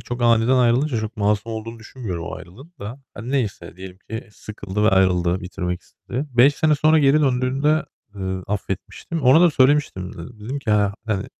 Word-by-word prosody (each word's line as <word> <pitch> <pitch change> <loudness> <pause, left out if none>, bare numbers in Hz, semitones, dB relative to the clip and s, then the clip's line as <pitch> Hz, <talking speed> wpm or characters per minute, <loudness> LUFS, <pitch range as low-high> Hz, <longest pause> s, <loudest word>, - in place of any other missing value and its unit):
çok 120 0 -5
aniden 120 +2 +4
ayrılınca 125 +1 +2
çok 110 +1 -6
masum 105 +2 0
olduğunu 115 +1 -6
düşünmüyorum 110 -8 -6
o - - -5
ayrılığın 130 - -13
da. 115 +7 -7
Hani, 115 +5 -7
neyse 105 -10 -2
diyelim 95 0 -10
ki 110 0 -6
sıkıldı 105 -1 -5
ve - - +5
ayrıldı, 90 -1 +2
bitirmek 90 -1 -4
istedi. 135 +5 -6
5 130 +4 +5
sene 155 +1 +2
sonra 155 +2 +4
geri 145 +1 +4
döndüğünde, 135 +3 +1 0.3
eee, 100 - -9 0.3
affetmiştim. 105 - -4
Ona 135 +6 +6
da 175 - +6
söylemiştim 130 -9 +2
de. - - -13 0.3
Dedim 135 +5 -3
ki, 125 -6 -3
"Ha 105 -1 +2
hani, 100 -2 -1
115 Hz, 180 wpm, -22 LUFS, 100-135 Hz, 0.3 s, Ona